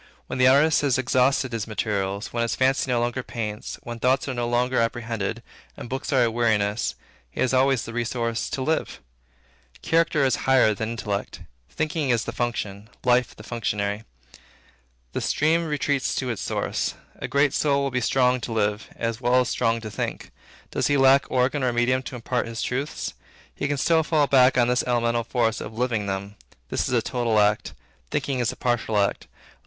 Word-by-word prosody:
When 130 - -5
the 125 - +6
artist 145 +4 +5
has 140 -4 +2
exhausted 130 +1 +2
his 115 -2 -3
materials, 100 -2 -2
when 120 - 0
the 115 - +1
fancy 130 +1 +1
no 125 -1 +2
longer 120 +2 -1
paints, 110 -3 -5
when 120 0 -6
thoughts 130 +4 +2
are 130 - -2
no 120 -1 -2
longer 125 +1 +1
apprehended, 115 -3 -2 0.3
and 120 - -8
books 135 +3 -3
are 130 -3 +4
a 115 - +1
weariness, 110 -2 +1 0.3
he - - -11
has 130 - +2
always 130 -1 +3
the 115 - -7
resource 115 -1 -2
to 130 - -3
live. 160 +3 -1 0.8
Character 165 -3 +2
is 130 - +2
higher 130 -5 +5
than 110 +2 -3
intellect. 105 -3 -4 0.3
Thinking 155 -2 -2
is 115 -2 +2
the - - -4
function. 110 -3 -3 0.2
Living 125 0 +5
is - - -17
the 105 - -12
functionary. 105 -2 -2 1.1
The - - -2
stream 165 +3 +2
retreats 145 -2 0
to 130 -2 -1
its 115 - -4
source. - - -2 0.2
A - - -4
great 140 0 +2
soul 140 -2 +2
will 140 - -1
be 125 0 0
strong 125 +1 +2
to 115 - -5
live, 105 -1 -1
as 115 0 -3
well 125 +1 +4
as 125 - -1
strong 115 0 0
to 110 -1 -7
think. - - -4 0.4
Does - - 0
he 145 - +2
lack 135 +1 +5
organ 130 +3 +1
or 125 - +2
medium 120 +2 +1
to 130 - -8
impart 120 0 -2
his 115 0 -4
truths? 135 - -3 0.4
He 145 - -2
can 145 0 -1
still 165 +3 +3
fall 155 -2 +2
back 130 -2 +5
on 120 -1 +4
this 125 0 +2
elemental 120 -1 +1
force 115 -2 0
of 110 - -8
living 115 -4 0
them. 100 +1 -4 0.3
This - - -1
is - - -2
a - - +2
total 115 -3 +1
act. 105 0 +1 0.3
Thinking 135 -2 -1
is 120 - +1
a - - -9
partial 120 -3 0
act. 100 -1 0
120 Hz, 195 wpm, -24 LUFS, 115-130 Hz, 1.1 s, the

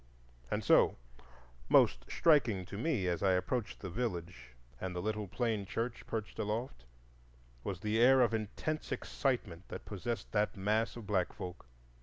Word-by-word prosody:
And - - -1
so - - +5 0.7
most - - +5
striking 120 - +3
to 95 - -8
me, 115 - 0
as 85 -2 0
I 95 -2 +4
approached 110 +5 -1
the 95 - -5
village 85 - -4 0.2
and 95 -1 -4
the - - -1
little 105 +1 -2
plain 110 +1 -1
church 115 +4 -3
perched 110 -1 -4
aloft, 105 - -3 0.8
was 95 -3 -4
the 110 +1 +1
air 130 +2 +7
of 115 -2 +3
intense 110 +8 -3
excitement 105 - -2
that - - -7
possessed 110 +3 -4
that 105 0 +1
mass 105 +4 +1
of 120 -3 -8
black 95 -4 +1
folk. 90 -6 -8
105 Hz, 155 wpm, -34 LUFS, 95-120 Hz, 0.8 s, air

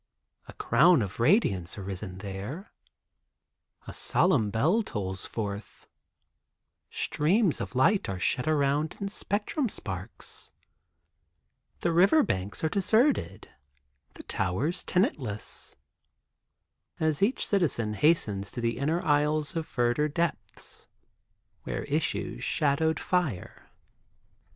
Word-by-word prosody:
A - - -10
Crown 150 +3 +4
of 100 +1 -7
Radiance 110 - +2
arisen 95 -1 -6
there. 100 - -7 1.1
A - - -8
solemn 130 - +2
bell 155 - +2
tolls 95 - -5
forth; 100 -2 -6 1.0
streams 180 +4 +1
of - - -6
light 160 - +3
are 95 - -3
shed 125 +9 0
around 150 0 +1
in 200 - -3
spectrum 210 +7 -2
sparks; 95 - -7 1.3
the 170 - +1
river 195 - +5
banks 95 - -2
are - - +3
deserted; 220 - +1 0.7
the - - -10
towers 125 - -1
tenantless, 125 - -1 1.2
as 155 -2 +1
each 215 +7 +2
citizen 135 - +1
hastens 105 -8 +1
to - - -6
the 115 0 -1
inner 160 +5 0
aisles 150 +2 +1
of 160 -1 -2
verdure 125 +5 +1
depths, 170 0 -4 0.7
where - - -4
issues - - -2
shadowed 155 +2 +1
fire. 155 - -2
145 Hz, 105 wpm, -28 LUFS, 105-175 Hz, 1.3 s, river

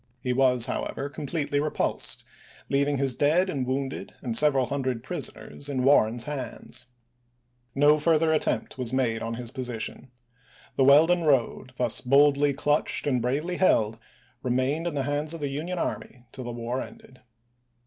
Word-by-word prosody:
He 125 0 -1
was, 125 -2 +4
however, 140 +2 -3
completely 145 0 -2
repulsed, 150 +1 -1 0.5
leaving 140 +1 +2
his 135 -1 +1
dead 165 +9 +2
and 130 -5 -3
wounded 135 +1 -3
and 120 -4 -2
several 140 -1 +4
hundred 130 -3 -2
prisoners 145 - -5
in 130 -3 -1
Warren's 120 -4 +4
hands. 135 -6 -5 0.9
No 145 +2 +5
further 160 0 +3
attempt 150 -3 -1
was 125 -2 -2
made 120 -4 0
on 115 +1 -3
his 120 0 -6
position. 125 -1 -5 0.7
The 135 - +3
Weldon 165 +5 +5
road, 130 -2 +1
thus 120 -3 +1
boldly 140 +2 +4
clutched 145 +2 0
and 130 -4 +1
bravely 150 +9 -1
held, 110 - +2 0.4
remained 130 +6 0
in 165 - -3
the 140 - 0
hands 145 +3 -2
of - - -7
the 145 -2 -2
Union 160 +6 -4
army 125 -6 -4
till 130 - -8
the 120 - -4
war 120 +2 -3
ended. 130 - -12
135 Hz, 155 wpm, -26 LUFS, 125-150 Hz, 0.9 s, No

